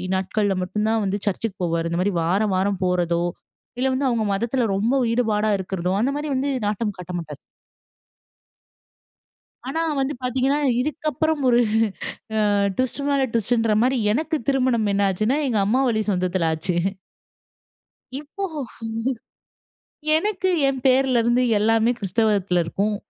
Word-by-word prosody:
நாட்கள்ல 195 Hz, +1 st, 0 dB
மட்டும் 210 Hz, +4 st, -2 dB
தான் 225 Hz, 0 st, +1 dB
வந்து 195 Hz, +1 st, -1 dB
சர்ச்சுக்கு 200 Hz, 0 st, -2 dB
போவாரு. 165 Hz, -1 st, 0 dB
இந்த 170 Hz, -, -1 dB
மாரி 200 Hz, +2 st, 0 dB
வார 180 Hz, +5 st, +1 dB
வாரம் 195 Hz, 0 st, 0 dB
போறதோ! 175 Hz, -1 st, +1 dB, 0.6 s
இல்ல 260 Hz, -, +2 dB
வந்து 265 Hz, +1 st, 0 dB
அவுங்க 230 Hz, -2 st, 0 dB
மதத்துல 235 Hz, +5 st, 0 dB
ரொம்ப 220 Hz, +6 st, +1 dB, 0.2 s
ஈடுபாடா 215 Hz, -3 st, +1 dB
இருக்கிறதோ! 185 Hz, -1 st, -2 dB
அந்த 260 Hz, +4 st, +1 dB
மாரி 300 Hz, +1 st, -3 dB
வந்து 275 Hz, +2 st, 0 dB, 0.2 s
நாட்டம் 210 Hz, 0 st, -2 dB
காட்ட 180 Hz, 0 st, -7 dB
மாட்டாரு. 150 Hz, -4 st, -8 dB, 2.3 s
ஆனா 320 Hz, +5 st, -2 dB, 0.2 s
வந்து 270 Hz, +2 st, -1 dB
பாத்தீங்கன்னா, 260 Hz, +3 st, +1 dB, 0.2 s
இதுக்க 305 Hz, +3 st, -2 dB
புறம் 315 Hz, -2 st, +1 dB
ஒரு, 240 Hz, -1 st, +5 dB, 0.9 s
ஆ, -, -, +2 dB, 0.3 s
ட்விஸ்ட்டு 260 Hz, +2 st, -1 dB
மேல 280 Hz, -1 st, +2 dB
ட்விஸ்ட்டுன்ற 225 Hz, 0 st, +2 dB
மாதிரி 260 Hz, +1 st, +1 dB, 0.2 s
எனக்கு 315 Hz, +4 st, -1 dB
திருமணம் 255 Hz, -5 st, +2 dB
என்ன 200 Hz, 0 st, +2 dB
ஆச்சுன்னா 215 Hz, +9 st, 0 dB
எங்க 220 Hz, -5 st, +1 dB
அம்மா 250 Hz, +6 st, +2 dB
வழி 220 Hz, -2 st, +1 dB
சொந்தத்துல 180 Hz, -2 st, 0 dB
ஆச்சு. 170 Hz, +3 st, -1 dB, 1.4 s
இப்போ 300 Hz, +8 st, -8 dB, 1.7 s
எனக்கு, 375 Hz, +2 st, 0 dB, 0.2 s
என் 270 Hz, -1 st, -1 dB
பேர்ல 260 Hz, -1 st, +4 dB
இருந்து 240 Hz, +2 st, +2 dB, 0.2 s
எல்லாமே 225 Hz, +2 st, +3 dB
கிறிஸ்தவத்துல 200 Hz, -3 st, +1 dB
இருக்கும். 200 Hz, +5 st, -1 dB
220 Hz, 135 wpm, -23 LUFS, 190-260 Hz, 2.3 s, ஒரு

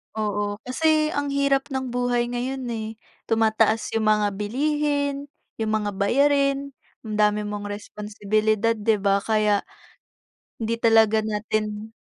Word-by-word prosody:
Oo, 205 Hz, -1 st, -1 dB
kasi 310 Hz, +4 st, +2 dB
ang 285 Hz, 0 st, -1 dB
hirap 280 Hz, 0 st, +2 dB
ng 265 Hz, -2 st, -3 dB
buhay 245 Hz, -1 st, 0 dB
ngayon 260 Hz, +2 st, -3 dB
eh, 220 Hz, -1 st, -4 dB, 0.4 s
tumataas 225 Hz, 0 st, +2 dB
yung 220 Hz, -1 st, 0 dB
mga 210 Hz, -1 st, +3 dB
bilihin, 285 Hz, +4 st, -1 dB, 0.3 s
yung 220 Hz, -1 st, -1 dB
mga 210 Hz, -1 st, 0 dB
bayarin, 275 Hz, +5 st, +2 dB, 0.3 s
ang 215 Hz, -1 st, -5 dB
dami 210 Hz, 0 st, +3 dB
mong 205 Hz, 0 st, -5 dB
responsibilidad, 210 Hz, +2 st, -1 dB
di 215 Hz, +1 st, +2 dB
ba? 200 Hz, 0 st, +2 dB
Kaya, 210 Hz, -1 st, +2 dB, 1.0 s
hindi 230 Hz, 0 st, -2 dB
talaga 225 Hz, -1 st, +5 dB
natin 215 Hz, 0 st, -3 dB
220 Hz, 125 wpm, -24 LUFS, 210-265 Hz, 1.0 s, talaga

